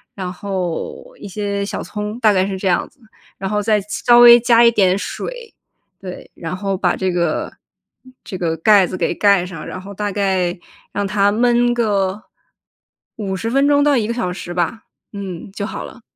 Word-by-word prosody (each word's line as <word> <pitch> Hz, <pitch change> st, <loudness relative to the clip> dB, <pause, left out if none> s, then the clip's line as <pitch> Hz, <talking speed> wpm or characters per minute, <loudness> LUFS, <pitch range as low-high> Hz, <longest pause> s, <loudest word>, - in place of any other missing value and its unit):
然 185 Hz, -2 st, -4 dB
后， 180 Hz, -3 st, -4 dB, 0.2 s
一 -, -, -8 dB
些 200 Hz, 0 st, -3 dB
小 -, -, -4 dB
葱， 210 Hz, +1 st, -5 dB
大 220 Hz, -3 st, +4 dB
概 185 Hz, -1 st, +2 dB
是 195 Hz, -1 st, -4 dB
这 190 Hz, -, -3 dB
样 175 Hz, -, +1 dB
子， -, -, -34 dB, 0.4 s
然 195 Hz, -, -4 dB
后 210 Hz, 0 st, 0 dB
再 210 Hz, 0 st, +2 dB
稍 240 Hz, +4 st, +3 dB
微 240 Hz, 0 st, +9 dB
加 235 Hz, 0 st, +4 dB
一 235 Hz, -, +6 dB
点 190 Hz, -4 st, +3 dB
水。 475 Hz, -, -6 dB, 0.5 s
对， 185 Hz, -2 st, -9 dB
然 165 Hz, +1 st, -5 dB
后 195 Hz, 0 st, -2 dB
把 180 Hz, -1 st, +1 dB
这 190 Hz, -1 st, -1 dB
个 170 Hz, -3 st, -1 dB, 0.7 s
这 -, -, -7 dB
个 165 Hz, -2 st, -1 dB
盖 195 Hz, +2 st, +5 dB
子 185 Hz, -, -5 dB
给 170 Hz, -, 0 dB
盖 200 Hz, -3 st, +3 dB
上， 180 Hz, -4 st, -8 dB
然 185 Hz, -, -6 dB
后 200 Hz, +1 st, -9 dB
大 205 Hz, +1 st, -3 dB
概 190 Hz, -3 st, 0 dB, 0.4 s
让 205 Hz, -, -1 dB
它 200 Hz, +1 st, +2 dB
焖 240 Hz, +2 st, +2 dB
个， 205 Hz, -3 st, 0 dB, 0.9 s
50 205 Hz, +1 st, -3 dB
分 275 Hz, +2 st, +3 dB
钟 285 Hz, 0 st, +4 dB
到 290 Hz, -1 st, +3 dB
1 215 Hz, -3 st, 0 dB
个 235 Hz, -, -1 dB
小 225 Hz, -7 st, -2 dB
时 175 Hz, -1 st, -7 dB
吧， 180 Hz, +6 st, -2 dB, 0.3 s
嗯， 195 Hz, -2 st, -7 dB
就 200 Hz, -, -5 dB
好 -, -, -6 dB
了。 245 Hz, -, -12 dB
200 Hz, 195 characters per minute, -19 LUFS, 185-225 Hz, 0.9 s, 微